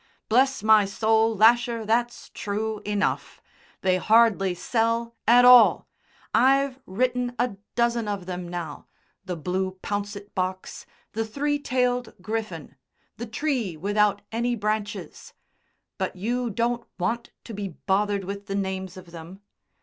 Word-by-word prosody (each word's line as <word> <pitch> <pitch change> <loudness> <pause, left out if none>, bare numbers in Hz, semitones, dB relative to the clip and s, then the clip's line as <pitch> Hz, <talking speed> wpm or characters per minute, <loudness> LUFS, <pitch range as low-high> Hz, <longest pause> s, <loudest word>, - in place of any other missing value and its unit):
Bless 260 +1 +3
my 215 -1 +6
soul, 220 +2 +2
Lasher, 230 +1 +4
that's 240 +2 -1
true 215 +1 -3
enough. 205 -1 -2 0.4
They 185 -1 +2
hardly 210 -3 +3
sell 230 +4 -1
at 245 +1 +7
all. 250 -2 +7 0.5
I've 270 +2 +3
written 245 +4 -1
a 240 -4 -1 0.2
dozen 235 -2 +1
of 200 -3 -3
them 180 -1 -5
now, 170 -4 -6 0.4
'The 180 - -3
Blue 185 +3 -3
Pouncet 205 0 -4
Box,' 185 0 -4 0.2
'The 225 +1 -2
Three 290 +5 -1
tailed 250 -2 -1
Griffin,' 185 -8 -5 0.4
'The 235 - -6
Tree 225 - -2
without 205 +4 +1
any 240 +2 0
Branches,' 215 0 -4 0.7
but 190 0 -2
you 235 +5 -2
won't 235 +1 0
want 225 +7 -2
to 230 - -9
be 200 -1 -4
bothered 200 +3 -1
with 200 +2 -6
the 195 - -3
names 190 -2 -3
of 180 -2 -12
them. 170 +4 -11
215 Hz, 135 wpm, -25 LUFS, 190-235 Hz, 0.7 s, at